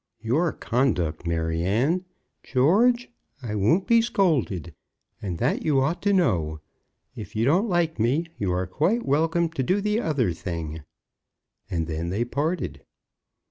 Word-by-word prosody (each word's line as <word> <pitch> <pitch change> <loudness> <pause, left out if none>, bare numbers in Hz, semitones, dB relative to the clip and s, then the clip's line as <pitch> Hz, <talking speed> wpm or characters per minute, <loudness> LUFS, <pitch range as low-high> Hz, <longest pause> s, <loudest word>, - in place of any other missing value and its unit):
"Your 150 +9 +1
conduct, 90 - -1
Maryanne 90 - 0 0.2
." 125 - -51
"George, 225 - +3 0.3
I 110 -3 -4
won't 110 - +2
be 230 0 +5
scolded, 145 - 0 0.5
and 90 -4 -4
that 125 - 0
you 145 -4 +2
ought 150 +6 0
to 205 - +2
know. 85 - +1 0.6
If 105 +6 -9
you 110 +2 +1
don't 180 - +3
like 170 - 0
me, 130 +9 +2
you 100 -3 0
are 90 +1 0
quite 195 - 0
welcome 165 +4 +2
to 160 -4 -3
do 185 +10 +1
the 210 +2 0
other 140 - 0
thing." 80 -2 -5 0.9
And 80 -2 -1
then 80 +1 -3
they 105 +6 -1
parted. 140 - -2
130 Hz, 145 wpm, -25 LUFS, -, 0.9 s, be